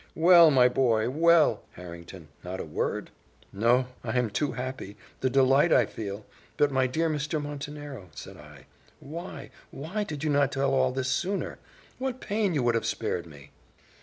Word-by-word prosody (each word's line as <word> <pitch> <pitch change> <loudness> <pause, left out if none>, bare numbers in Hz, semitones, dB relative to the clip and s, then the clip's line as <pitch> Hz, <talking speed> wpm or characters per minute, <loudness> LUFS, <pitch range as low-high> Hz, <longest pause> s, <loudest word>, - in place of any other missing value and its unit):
"Well, 170 0 +7
my 130 -4 +5
boy! 120 -2 +1
well, 165 +2 +4
Harrington! 85 -1 -11
not 95 +1 -6
a - - -4
word?" 75 - -3 0.4
"No 120 +5 +3 0.2
I 120 +1 -2
am 120 -4 0
too 145 +7 -1
happy! 125 -5 -6 0.2
the 130 - 0
delight 135 +5 +4
I - - +5
feel 100 -1 -7 0.3
But, 145 -1 +3
my 130 -1 +2
dear 160 +6 0
Mr. 155 0 -2
Montenero," 145 -6 -7
said - - -9
I, 75 -3 -15 0.3
"why 170 +6 -8 0.2
why 175 +10 -4
did 150 -6 -6
not 140 -2 +2
you - - -3
tell 135 0 +1
all 130 -1 +2
this 130 0 -2
sooner? 195 +2 -2 0.4
What 260 -1 -3
pain 205 -6 -1
you 140 - +1
would 120 -1 +2
have 115 - -1
spared 85 -1 -3
me!" 70 -2 -15
135 Hz, 170 wpm, -27 LUFS, 110-150 Hz, 0.4 s, Well